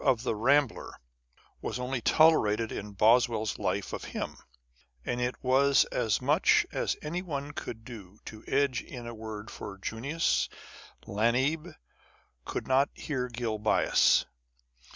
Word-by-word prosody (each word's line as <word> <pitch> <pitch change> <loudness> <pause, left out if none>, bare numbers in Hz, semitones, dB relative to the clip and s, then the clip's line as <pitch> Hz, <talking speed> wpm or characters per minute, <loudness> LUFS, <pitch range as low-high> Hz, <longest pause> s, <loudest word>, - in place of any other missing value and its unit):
of 130 -5 +2
the 125 - 0
Rambler 135 +3 +1 0.6
was - - -3
only 125 0 -3
tolerated 115 -8 +4
in 105 0 -6
Boswcll's 110 0 +3
Life - - -2
of - - -5
him; - - -5 0.7
and 120 0 -2
it 125 +1 -1
was 135 +2 +4
as 110 -3 +1
much - - +3
as - - -1
anyone 150 -3 -4
could 120 -8 -7
do 105 -5 -11
to 110 0 -10
edge 135 -3 +1
in 120 -2 -9
a 120 - -6
word 110 -1 -7
for 100 -1 -8
Junius. 135 - -1 0.6
Lamb 130 - 0 0.7
could - - -4
not 135 +2 +3 0.2
bear 130 -4 -1
Gil 115 -3 -3
Bias. 105 0 +3
125 Hz, 130 wpm, -29 LUFS, 110-140 Hz, 0.7 s, tolerated